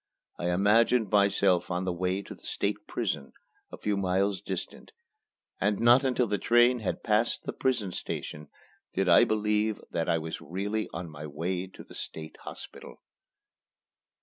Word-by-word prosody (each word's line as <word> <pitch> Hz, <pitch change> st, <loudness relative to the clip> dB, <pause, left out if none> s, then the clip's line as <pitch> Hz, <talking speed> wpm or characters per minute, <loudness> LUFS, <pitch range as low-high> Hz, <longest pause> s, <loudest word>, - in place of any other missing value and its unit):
I 85 Hz, -, -1 dB
imagined 105 Hz, +4 st, +3 dB
myself 100 Hz, -3 st, +3 dB
on 90 Hz, +1 st, -1 dB
the 90 Hz, -, 0 dB
way 95 Hz, +3 st, -1 dB
to -, -, -9 dB
the -, -, -17 dB
State -, -, -2 dB
Prison, 70 Hz, -, -3 dB, 0.4 s
a -, -, -8 dB
few 105 Hz, -1 st, -1 dB
miles 95 Hz, +1 st, +1 dB
distant; -, -, -6 dB, 0.7 s
and 105 Hz, -1 st, +1 dB
not 120 Hz, +3 st, +6 dB
until 125 Hz, -2 st, +2 dB
the 105 Hz, -2 st, -1 dB
train 120 Hz, +1 st, +4 dB
had 105 Hz, -, -3 dB
passed 110 Hz, +1 st, +1 dB
the -, -, -4 dB
prison 120 Hz, -8 st, 0 dB
station 75 Hz, -3 st, -5 dB, 0.4 s
did 95 Hz, 0 st, 0 dB
I 85 Hz, -, +7 dB
believe 105 Hz, 0 st, +1 dB
that 85 Hz, -1 st, -1 dB
I 85 Hz, -, +3 dB
was 80 Hz, 0 st, -5 dB
really 105 Hz, +5 st, -3 dB
on 85 Hz, +1 st, -5 dB
my 75 Hz, +1 st, -7 dB
way 90 Hz, +5 st, -3 dB
to 95 Hz, -, -12 dB
the -, -, -15 dB
State 80 Hz, 0 st, -6 dB
Hospital. -, -, -9 dB
100 Hz, 160 wpm, -29 LUFS, 90-110 Hz, 0.7 s, I